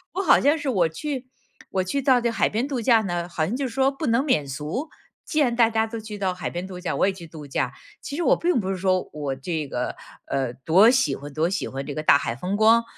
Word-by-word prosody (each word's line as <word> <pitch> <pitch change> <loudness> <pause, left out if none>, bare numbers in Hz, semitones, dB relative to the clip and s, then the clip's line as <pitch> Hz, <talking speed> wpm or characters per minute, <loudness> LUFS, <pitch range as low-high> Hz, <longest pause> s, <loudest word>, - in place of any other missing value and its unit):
我 385 - 0
好 390 - +5
像 290 +3 +4
是 295 - -5
我 185 -10 +2
去 260 - -5 0.4
我 190 - 0
去 275 +9 -1
到 260 -2 +4
这 235 0 0
海 230 - +1
边 230 +5 -1
度 265 -5 -2
假 230 0 +5
呢， 175 -2 -3
好 160 -2 -1
像 210 - -2
就 275 +1 -2
是 245 - -5
说 265 +2 +3
不 275 +2 -4
能 235 +3 +3
免 150 - +1
俗， 150 - -4 0.4
既 310 - -1
然 245 -4 +2
大 230 -2 +5
家 220 0 +1
都 225 0 -6
去 215 -1 -7
到 190 -2 -1
海 180 -2 -4
边 175 +1 -5
度 185 -1 -8
假， 180 - -3
我 - - +2
也 - - +2
去 175 -3 -11
度 155 -2 -10
假， 135 - -1 0.3
其 285 - -6
实 345 - -1
我 - - +5
并 345 -6 +1
不 190 - -4
是 195 - -1
说 185 0 0
我 145 -3 -3
这 155 +2 -3
个， 125 -2 -3 0.3
呃， 130 -3 -1
多 175 - +5
喜 265 +2 +2
欢 145 +1 -10
多 160 +4 +1
喜 190 0 -2
欢 135 +1 -5
这 145 - -5
个 155 - -3
大 140 - +6
海 115 - -3
风 180 +10 -3
光， 225 +2 +5
195 Hz, 290 characters per minute, -24 LUFS, 160-250 Hz, 0.4 s, 大